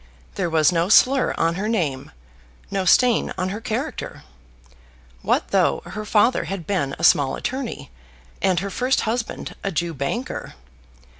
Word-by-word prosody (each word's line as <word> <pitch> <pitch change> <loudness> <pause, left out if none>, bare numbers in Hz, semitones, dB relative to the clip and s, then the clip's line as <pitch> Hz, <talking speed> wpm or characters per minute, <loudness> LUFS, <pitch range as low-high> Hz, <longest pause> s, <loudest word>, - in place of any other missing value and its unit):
There 175 - -2
was 160 -1 +3
no 170 +1 0
slur 260 +4 +4
on 165 0 +1
her 200 +5 -3
name; 150 -12 -1 0.6
no 195 -1 -1
stain 245 +5 +4
on 185 0 -1
her 210 +3 -5
character. 250 +6 -4 1.0
What - - 0
though - - +2
her 215 0 -6
father 215 +4 +2
had 190 -4 -5
been 150 -8 -1
a - - -8
small 140 -2 +4
attorney, 260 - -5 0.5
and 185 -2 +2
her 200 0 -4
first 250 +6 +1
husband 230 +1 -3
a 195 - -1
Jew 170 0 -2
banker! 145 - -4
195 Hz, 150 wpm, -22 LUFS, 165-230 Hz, 1.0 s, slur